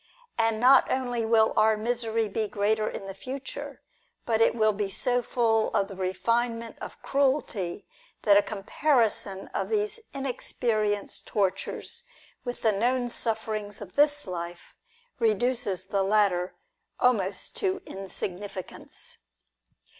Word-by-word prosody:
And 225 -1 +2
not 255 +3 +6
only 245 -3 0
will 220 -1 +4
our 215 0 +4
misery 225 0 0
be 215 +1 -1
greater 215 +1 +1
in - - -6
the 195 - -6
future, 260 +7 -7 0.4
but 225 -1 +1
it 225 - +5
will 215 -2 +3
be 205 -1 -2
so 245 +5 0
full 225 -2 +1
of 195 - +2
the 195 - -7
refinement 230 +5 -1
of - - -7
cruelty, 260 -10 0 0.4
that 205 -2 +6
a 205 - +7
comparison 210 -2 0
of - - -2
these 425 +1 0
unexperienced 225 -6 -1
tortures 210 - 0 0.4
with 245 -1 -5
the 220 - +5
known 245 +4 +1
sufferings 215 -3 -2
of 195 -3 -9
this 290 0 +3
life, 175 -2 -6 0.5
reduces 225 -3 +1
the 195 0 0
latter 195 -3 +2 0.4
almost 200 -6 +1
to 385 -1 -1
insignificance. 190 -1 -6
220 Hz, 125 wpm, -27 LUFS, 200-245 Hz, 0.5 s, a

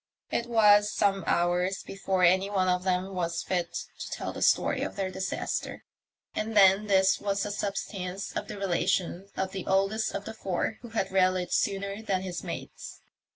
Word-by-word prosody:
It 235 - -1
was 210 -3 +5
some 195 -3 +1
hours 180 +2 +1
before 195 -1 -1
any 190 +3 +4
one 190 -2 +1
of 180 0 +1
them 185 +1 0
was 170 -2 -2
fit 175 -2 -1 0.3
to - - -5
tell - - -4
the - - -7
story - - +3
of - - -3
their 190 -2 -2
disaster, 190 +1 -3 0.5
and 215 0 -2
then 195 +1 +6
this 190 -1 +4
was 200 -1 -1
the 205 - -3
substance 195 -2 -4
of - - -3
the - - -7
relation 190 0 -1
of 190 0 -1
the 190 -2 -6
oldest 195 +3 +1
of 200 0 -4
the 220 - -6
four, 195 0 -2
who 240 - -9
had 220 -4 -2
rallied 185 -1 +2
sooner 200 +1 -1
than 195 -4 -1
his 180 -2 -5
mates. - - -7
195 Hz, 180 wpm, -28 LUFS, 185-205 Hz, 0.5 s, then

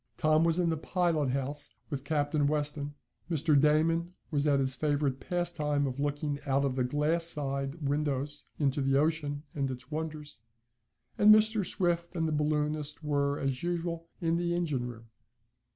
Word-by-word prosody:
Tom 155 0 +3
was 165 0 +3
in 175 -2 +2
the 160 - -1
pilot 165 -3 0
house 135 +2 -2 0.2
with 135 -2 -3
Captain 145 -1 +1
Weston, 145 -1 -1 0.3
Mr. 155 -2 +2
Damon 165 +4 +2 0.2
was 145 -1 +1
at 140 -1 +4
his 135 -1 +1
favorite 145 -2 0
pastime 155 -3 -1
of 130 0 -3
looking 145 0 -1
out 140 +1 +2
of 130 -2 -1
the 130 - +1
glass 150 +6 +1
side 140 -1 -3
windows 145 -1 -1
into 140 -1 +1
the 135 0 +2
ocean 145 -1 0
and 140 -2 -1
its 125 +1 -7
wonders, 155 -4 -5 0.8
and 210 +1 +8
Mr. 215 0 +5
Swift 175 -1 -1
and 165 -1 0
the - - -1
balloonist 150 0 -1
were, 145 -1 +1
as 135 -2 -2
usual, 170 -1 -2
in 165 -1 +1
the 175 0 0
engine 150 -8 -1
room. 115 -2 -9
150 Hz, 165 wpm, -30 LUFS, 140-165 Hz, 0.8 s, and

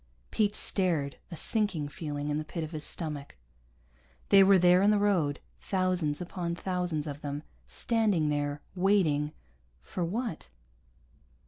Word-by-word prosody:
Pete 210 -1 +1
stared, 165 -8 0
a 175 - -7
sinking 190 -5 +1
feeling 145 -1 -5
in 150 +1 0
the - - -3
pit 165 +1 -5
of 155 - -6
his 155 -2 -4
stomach. 150 - -3 0.9
They 195 -1 +8
were 195 0 +6
there 180 +1 +5
in 200 - +5
the 210 - +4
road, 180 -8 +1 0.2
thousands 185 -6 0
upon 175 -1 -4
thousands 180 -4 -2
of 145 -1 -6
them, 145 +1 -4 0.2
standing 205 - +1
there, 145 0 -2
waiting 180 -6 +2 0.5
for 180 - -4
what? 200 - -3
170 Hz, 140 wpm, -29 LUFS, 150-190 Hz, 0.9 s, They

